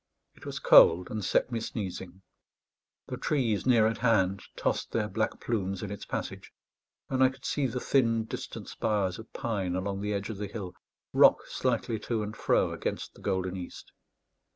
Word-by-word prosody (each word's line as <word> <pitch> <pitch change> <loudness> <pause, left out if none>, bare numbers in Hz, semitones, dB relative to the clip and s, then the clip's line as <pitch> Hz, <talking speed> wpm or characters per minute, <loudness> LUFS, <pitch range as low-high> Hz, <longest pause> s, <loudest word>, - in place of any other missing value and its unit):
It - - -13
was - - -4
cold, 85 +2 +6
and 110 -1 -3
set 120 - +1
me 115 - -1
sneezing. 95 -4 -6 0.8
The - - -5
trees 125 -7 0
near 115 -4 +5
at 115 +1 0
hand 100 -5 +2
tossed - - -1
their 110 -2 +1
black 110 +2 -2
plumes 100 -4 -2
in 100 - -5
its 100 - -7
passage; - - -5 0.6
and 130 0 +2
I 130 - +6
could 130 0 -13
see 145 -3 0
the 125 +1 -3
thin 115 -4 +2
distant - - -7
spires 100 -4 -1
of 110 - -11
pine 95 -6 -2
along 95 +1 -2
the 105 0 -1
edge 100 +3 -3
of 105 - -7
the 105 0 -4
hill 95 -3 -6 0.4
rock - - +6
slightly 110 -2 -1
to 110 0 -2
and 105 +1 -6
fro - - +2
against - - -4
the - - -17
golden 95 0 -1
east. 90 -2 -8
105 Hz, 180 wpm, -29 LUFS, 95-115 Hz, 0.8 s, cold